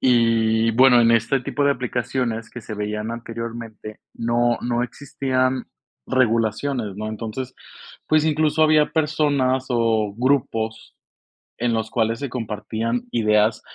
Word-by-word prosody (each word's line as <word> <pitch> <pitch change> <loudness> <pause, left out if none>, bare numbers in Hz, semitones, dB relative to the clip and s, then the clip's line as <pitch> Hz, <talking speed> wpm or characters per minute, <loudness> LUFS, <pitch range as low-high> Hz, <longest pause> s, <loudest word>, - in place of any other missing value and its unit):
Y 115 -2 +3
bueno, 125 +2 +6
en 115 - +4
este 115 +3 +2
tipo 145 +3 -2
de 140 0 +4
aplicaciones 120 -2 -2
que 120 - -9
se 110 - -8
veían 105 +1 -3
anteriormente, 115 -2 -7 0.2
no 120 +1 +1
no 120 0 0
existían 130 0 -1 0.4
regulaciones, 115 -2 0
¿no? 110 +1 -4
Entonces, 115 +4 -5 0.5
pues, 155 0 +3
incluso, 155 0 +2
había 155 -1 +5
personas 145 -5 +1
o 115 -4 +1
grupos 115 -4 -1 0.6
en 120 0 +1
los 110 -1 -2
cuales 115 -1 0
se 140 - -4
compartían 115 0 -3
ideas, 105 -1 +2
115 Hz, 125 wpm, -22 LUFS, 110-130 Hz, 0.6 s, bueno